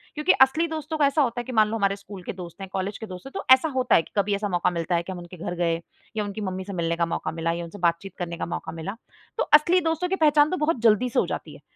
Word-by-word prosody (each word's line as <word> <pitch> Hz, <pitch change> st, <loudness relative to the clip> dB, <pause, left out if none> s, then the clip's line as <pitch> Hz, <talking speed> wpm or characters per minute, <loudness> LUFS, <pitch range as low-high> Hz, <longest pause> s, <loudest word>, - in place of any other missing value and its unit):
क्योंकि 300 Hz, +4 st, +3 dB
असली 290 Hz, +6 st, +5 dB
दोस्तों 315 Hz, 0 st, -4 dB
का 295 Hz, -, +4 dB
ऐसा 290 Hz, +2 st, +2 dB
होता 245 Hz, -3 st, 0 dB
है -, -, -8 dB
कि 255 Hz, -, -6 dB
मान 215 Hz, -3 st, +4 dB
लो 225 Hz, -, -2 dB
हमारे 195 Hz, -2 st, +1 dB
स्कूल 200 Hz, -2 st, -11 dB
के -, -, -5 dB
दोस्त 180 Hz, 0 st, -10 dB
हैं, 195 Hz, -, -5 dB
कॉलेज 195 Hz, +1 st, -2 dB
के 220 Hz, -, -7 dB
दोस्त 185 Hz, +2 st, -9 dB
हैं 270 Hz, -, -10 dB
तो -, -, -4 dB
ऐसा 260 Hz, +5 st, +3 dB
होता 255 Hz, -1 st, +3 dB
है -, -, +5 dB
कि -, -, -17 dB
कभी 200 Hz, 0 st, +2 dB
ऐसा 205 Hz, 0 st, -2 dB
मौका 175 Hz, -1 st, +1 dB
मिलता 170 Hz, 0 st, -1 dB
है 170 Hz, -, 0 dB
कि 190 Hz, -, -7 dB
हम 185 Hz, -, -6 dB
उनके 175 Hz, +1 st, -11 dB
घर 175 Hz, +1 st, -4 dB
गए 170 Hz, -1 st, +1 dB, 0.4 s
या 210 Hz, -, +1 dB
उनकी 205 Hz, +1 st, -5 dB
मम्मी 190 Hz, -2 st, -3 dB
से 200 Hz, -, -6 dB
मिलने 170 Hz, -1 st, -1 dB
का 170 Hz, 0 st, +1 dB
मौका 165 Hz, -, -3 dB
मिला 165 Hz, 0 st, -1 dB
या 170 Hz, +1 st, -3 dB
उनसे 170 Hz, +5 st, -10 dB
बातचीत 170 Hz, +3 st, 0 dB
करने 170 Hz, -1 st, -4 dB
का -, -, -3 dB
मौका -, -, -5 dB
मिला। 165 Hz, +5 st, -6 dB, 0.4 s
तो -, -, +2 dB
असली 325 Hz, +5 st, +6 dB
दोस्तों 325 Hz, +2 st, -1 dB
की 385 Hz, -, +1 dB
पहचान 300 Hz, -3 st, +4 dB
तो 370 Hz, -, 0 dB
बहुत 300 Hz, -6 st, 0 dB
जल्दी 230 Hz, +2 st, +4 dB
से -, -, +1 dB
हो -, -, +2 dB
जाती -, -, -5 dB
है। -, -, -15 dB
200 Hz, 310 wpm, -25 LUFS, 175-275 Hz, 0.4 s, असली